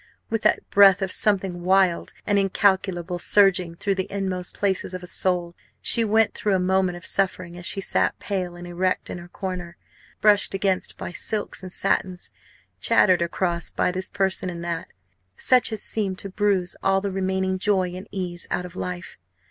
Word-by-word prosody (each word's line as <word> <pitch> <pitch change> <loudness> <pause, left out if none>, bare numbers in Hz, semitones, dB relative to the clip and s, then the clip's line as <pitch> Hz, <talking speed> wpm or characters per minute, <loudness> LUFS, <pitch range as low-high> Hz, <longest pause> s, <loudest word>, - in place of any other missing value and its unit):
with 225 -1 0
that 215 - +1
breath 195 -1 +6
of 190 - -2
something 190 -4 +1
wild 185 -1 +2
and 205 -1 +2
incalculable 190 -2 +1
surging 185 -4 +3
through 200 +3 0
the 190 -1 -4
inmost 190 -2 -3
places 190 -2 -1
of 185 - -6
the - - -8
soul, 175 -1 0 0.3
she 230 - +4
went 220 0 +2
through 205 -2 0
a - - +1
moment 185 0 +1
of 175 - -12
suffering 185 -3 +1
as 175 0 -5
she - - 0
sat 195 - 0
pale 185 -3 -3
and 175 0 -9
erect 180 +1 -2
in - - -5
her 175 - -11
corner 180 -2 -6 0.4
brushed 205 -2 +3
against 190 -1 -1
by - - -6
silks 205 +4 -2
and 185 -1 -8
satins, 185 -1 -1 0.5
chattered 185 -3 +4
across 170 0 -1
by - - 0
this 185 +1 -1
person 190 -2 0
and 170 -1 -6
that 170 -1 -3 0.5
such 250 - +3
as 215 -2 -4
seemed 195 -4 -2
to 195 - -6
bruise 195 -2 0
all 195 0 +2
the 200 0 -3
remaining 190 0 -1
joy 190 -3 +1
and 185 +3 -8
ease 180 -3 -5
out 180 - -2
of 180 0 -11
life. 180 - -6
185 Hz, 180 wpm, -24 LUFS, 180-195 Hz, 0.5 s, breath